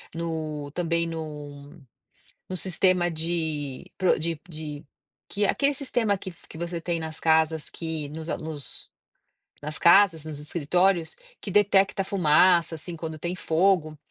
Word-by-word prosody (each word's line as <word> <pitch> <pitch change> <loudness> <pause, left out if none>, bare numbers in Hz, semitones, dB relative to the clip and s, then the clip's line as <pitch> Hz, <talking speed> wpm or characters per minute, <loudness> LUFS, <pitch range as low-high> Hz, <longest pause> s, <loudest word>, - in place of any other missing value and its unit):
no 155 -3 -4
também 170 -1 0
no 150 -1 -8 0.7
no 185 - -3
sistema 180 -1 +3
de 160 -4 -2
pro 185 -2 +3
de 165 -1 -2
de 155 -3 -7 0.5
que 205 +1 0
aquele 280 +7 +2
sistema 240 -7 0
que 185 - -6 0.2
que - - -10
você 170 0 -3
tem 170 0 -2
nas 160 0 -4
casas 160 -1 +2
que, 160 -3 -4
nos 160 +1 -7
nos 155 -4 -5 0.7
nas 150 +1 -4
casas, 170 -3 +5
nos 155 -2 -5
escritórios, 170 +3 +1 0.3
que 200 - -6
detecta 195 -1 +3
fumaça 175 -2 +4
assim 170 +2 -5
quando 160 -1 -6
tem 175 +3 -3
fogo, 165 -2 +1
165 Hz, 135 wpm, -26 LUFS, 155-180 Hz, 0.7 s, casas